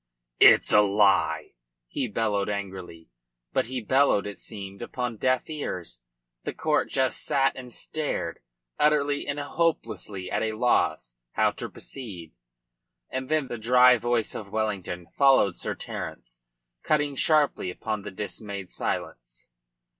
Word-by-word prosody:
"It's - - +7
a 105 - +8
lie!" 100 0 +2 0.3
he 125 - -2
bellowed 105 -2 0
angrily. 95 -7 -6 0.4
But - - +1
he 130 0 -3
bellowed, 130 -2 +3
it 100 -1 -7
seemed, 100 -3 -9
upon 120 -1 -4
deaf 130 +3 +1
ears. 90 - -5 0.4
The - - -4
court - - +1
just 130 -1 0
sat 135 -1 +2
and 125 -2 -9
stared, 155 +4 -3 0.4
utterly 145 -1 +2
and 145 0 -2
hopelessly 145 - -2
at - - 0
a 110 -1 -1
loss 110 - +1 0.2
how - - +3
to - - -6
proceed. 95 - -9 0.8
And 130 0 -4
then 155 -3 +1
the 120 - -5
dry 125 +2 +6
voice 120 -1 0
of 100 - -7
Wellington 100 -5 -2
followed 130 -6 +4
Sir - - -4
Terence, - - -7 0.4
cutting 150 -2 +1
sharply 150 - +2
upon 110 +3 -4
the - - -6
dismayed 100 -1 -6
silence. - - -5
110 Hz, 135 wpm, -26 LUFS, 100-135 Hz, 0.8 s, a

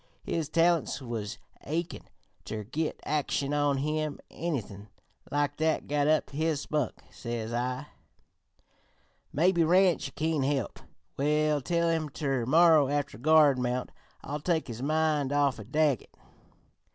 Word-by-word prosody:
His 160 -3 -2
talents 165 -2 +2
was 110 -5 -5 0.3
achin' 165 +4 -4 0.4
ter 110 -1 -5
git 150 +9 -3
action 145 -1 -1
on 145 -1 +2
him; 155 +1 -2
anythin' 110 - -4 0.4
like 145 0 0
that 160 0 0
got 145 0 +1
up 155 -1 +2
his 155 +1 0
spunk. 150 -4 -2
Says 120 -1 -5
I: 125 +3 -2 1.5
"'Maybe 170 +3 +3
Ranch 175 -5 +3
kin 160 -1 0
help. 135 -2 -1 0.4
We'll 150 +1 +2
tell 170 +4 0
him 160 -2 0
ter 135 -5 -2
morrer 160 -1 +5
after 145 -6 -2
guard 150 -1 +5
mount. 125 0 -2 0.3
It'll 145 +2 -4
take 160 0 0
his 115 +1 -6
mind 155 -1 +1
off 145 -4 +2
Daggett.' 150 -4 +1
145 Hz, 125 wpm, -29 LUFS, 135-160 Hz, 1.5 s, morrer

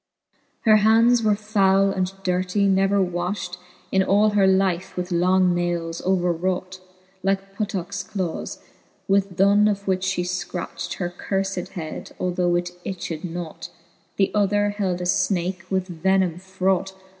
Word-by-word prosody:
Her 215 -2 +6
hands 230 +3 +5
were 215 -2 +3
foule 195 -2 +2
and 185 -1 -1
durtie, 185 +2 +1
never 195 +1 +3
wafbt, 180 0 -2 0.3
In 190 - +3
all 205 +3 +3
her 200 -2 +4
life, 190 -2 +1
with 180 0 -3
long 180 +1 +3
nayles 175 -1 -2
over 180 -1 +2
raught, 185 +2 -2 0.4
Like 195 +1 -1
puttockes 195 -3 -3
clawcs; 185 -4 -4 0.5
with 195 -2 +1
th'one 200 +2 +5
of 200 -1 -3
which 190 0 +1
{he 175 - -1
fcracht 180 0 -4
Her 175 -1 -4
curfed 195 -1 -2
head, 160 -3 -7
although 180 -1 +1
it 175 0 -1
itched 170 -4 -5
naught;, 170 -1 -6 0.5
The 195 - +2
other 205 0 +2
held 190 -4 -2
a - - -2
fnake 185 0 0
with 185 -4 -3
venime 190 -2 +2
fraught. 190 0 -1
190 Hz, 145 wpm, -23 LUFS, 180-195 Hz, 0.5 s, Her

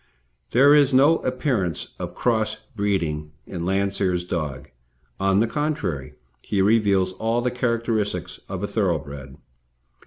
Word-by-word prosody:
There 140 +4 +6
is 145 -3 +5
no 145 +5 +6
appearance 125 - -1
of - - -5
cross 110 -3 0 0.2
breeding 80 -8 -1
in 85 -2 -5
Landseer's 95 -1 0
dog; 75 -7 -4 0.5
on 95 +1 +3
the - - +4
contrary, 115 - -2 0.3
he 100 - -2
reveals 100 -2 +3
all 115 +4 0
the 125 +1 0
characteristics 115 -3 -1
of 95 0 -4
a - - 0
thoroughbred. 70 - -2
100 Hz, 125 wpm, -23 LUFS, 85-120 Hz, 0.5 s, There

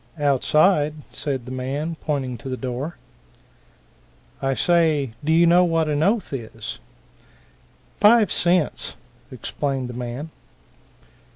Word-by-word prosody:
"Outside," 150 +2 +3 0.2
said 135 -5 -3
the 125 - -8
man, 140 +6 -3
pointing 135 -5 -2
to 135 - -7
the 130 - -3
door. 130 +6 -4 1.4
"I 135 0 0
say, 160 -7 +2
do 155 - 0
you 170 +1 +5
know 175 +2 +6
what 165 -2 +1
an 150 -1 0
oath 200 0 +1
is?" 115 -4 -6 1.2
"Five 210 -2 +6
cents," 175 -4 +1 0.4
explained 135 -3 -3
the - - -6
man. 125 +6 -5
145 Hz, 115 wpm, -23 LUFS, 130-165 Hz, 1.4 s, know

